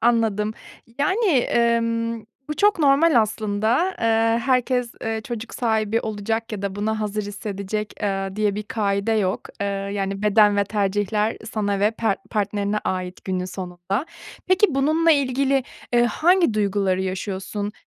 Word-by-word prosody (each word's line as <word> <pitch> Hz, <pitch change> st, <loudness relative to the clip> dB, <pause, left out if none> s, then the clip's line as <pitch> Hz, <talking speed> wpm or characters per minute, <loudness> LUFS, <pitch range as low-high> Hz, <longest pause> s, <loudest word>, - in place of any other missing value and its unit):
Anladım. 220 Hz, -3 st, +2 dB, 0.5 s
Yani, 375 Hz, +11 st, +1 dB
emm, 230 Hz, -4 st, +1 dB, 0.3 s
bu 300 Hz, -, -2 dB
çok 410 Hz, -3 st, +3 dB
normal 285 Hz, -2 st, +5 dB
aslında, 215 Hz, -, 0 dB
eee, 225 Hz, 0 st, +3 dB
herkes, 250 Hz, -1 st, +1 dB
eee, 225 Hz, 0 st, -2 dB
çocuk 235 Hz, -1 st, -6 dB
sahibi 220 Hz, -1 st, +1 dB
olacak 220 Hz, +1 st, -3 dB
ya 200 Hz, -, -4 dB
da 195 Hz, -1 st, -2 dB
buna 215 Hz, +1 st, -1 dB
hazır 210 Hz, 0 st, -2 dB
hissedecek, 205 Hz, 0 st, -4 dB
eee, 195 Hz, -1 st, -2 dB
diye 210 Hz, -2 st, +1 dB
bir 210 Hz, -, -3 dB
kaide 205 Hz, 0 st, -1 dB
yok, 195 Hz, -4 st, +1 dB, 0.2 s
eee, 200 Hz, -, 0 dB
yani, 195 Hz, 0 st, -3 dB
beden 210 Hz, -1 st, +5 dB
ve 200 Hz, -, +3 dB
tercihler 205 Hz, +1 st, 0 dB, 0.2 s
sana 205 Hz, -2 st, -1 dB
ve 205 Hz, +1 st, +4 dB
pert 220 Hz, -3 st, -1 dB
partnerine 205 Hz, -1 st, -1 dB
ait 185 Hz, 0 st, -3 dB
günün 185 Hz, -1 st, -2 dB
sonunda. 185 Hz, -, -4 dB, 0.4 s
Peki 375 Hz, +3 st, +5 dB
bununla 310 Hz, +4 st, +3 dB
ilgili, 275 Hz, -1 st, +2 dB, 0.3 s
eee, 240 Hz, 0 st, +5 dB
hangi 335 Hz, -, +3 dB
duyguları 200 Hz, -3 st, +1 dB
yaşıyorsun? 195 Hz, +2 st, -4 dB
215 Hz, 140 wpm, -23 LUFS, 200-235 Hz, 0.5 s, normal